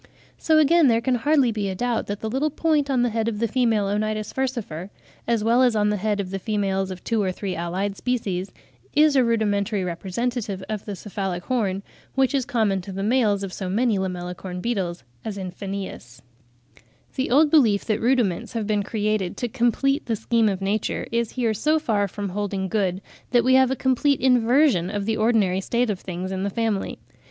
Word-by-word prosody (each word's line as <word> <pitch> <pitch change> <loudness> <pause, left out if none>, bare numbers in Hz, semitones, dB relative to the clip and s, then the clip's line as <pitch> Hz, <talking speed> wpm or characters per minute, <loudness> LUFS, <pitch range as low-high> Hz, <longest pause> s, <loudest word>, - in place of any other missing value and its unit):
So, 315 -1 +3
again, 310 +1 +5
there 230 -2 +4
can 255 +2 0
hardly 265 0 +3
be 210 -2 -2
a 190 - -3
doubt 240 +3 -1
that 205 0 -4
the 220 - -2
little 265 +7 0
point 305 -1 +1
(a) - - +1
on 245 -2 +2
the 245 - +1
head 225 0 -1
of 225 -2 -1
the 230 +2 0
female 225 -3 +1
Onitis 215 +1 -2
furcifer, 235 -10 -3 0.4
as 230 -2 +1
well 235 +3 +4
as 245 -3 +4
on 210 -1 +2
the 210 - 0
head 205 +1 -1
of 190 -2 -3
the 195 - -3
females 195 -2 -1
of 185 -1 -8
two 225 -2 0
or 190 -2 0
three 190 0 -4
allied 185 +4 -2
species, 200 -6 -2 0.4
is 300 0 +5
a 260 - +5
rudimentary 210 -3 0
representative 195 +3 -3
of 215 -2 -4
the 205 - -5
cephalic 190 -3 -4
horn, 200 -6 -1 0.3
which 270 0 +2
is 270 -3 +1
common 210 -5 +1
to 195 - -8
the 195 +1 -4
males 210 -3 +2
of 190 -2 -5
so 190 -2 -4
many 220 +1 +1
Lamellicorn 180 0 -4
beetles, 185 -6 -2 0.2
as 210 -2 -5
in 185 -2 -5
Phanaeus 190 -11 -7 0.5
(Fig. - - -34
18). 115 - -24 0.3
The 265 - 0
old 290 +4 +4
belief 225 -10 +4
that 215 -1 0
rudiments 235 -8 +1
have 225 -2 -2
been 210 -1 +1
created 210 -3 -1
to 245 - -2
complete 265 +4 +1
the 230 - +1
scheme 225 0 +2
of 195 -1 -3
nature 205 +2 -1
is 235 -1 -1
here 235 -4 0
so 305 +9 +2
far 215 -9 0
from 200 +1 -5
holding 195 0 -2
good, 190 -3 0 0.3
that 240 -2 +3
we 260 +2 +3
have 260 -1 +5
a 265 - 0
complete 265 +2 +2
inversion 250 - +3
of 205 0 -3
the 220 0 0
ordinary 215 -5 +2
state 235 +3 0
of 190 - -4
things 185 +1 -5
in 190 0 -3
the 200 - -1
family. 220 -1 -2
215 Hz, 210 wpm, -23 LUFS, 195-245 Hz, 0.5 s, again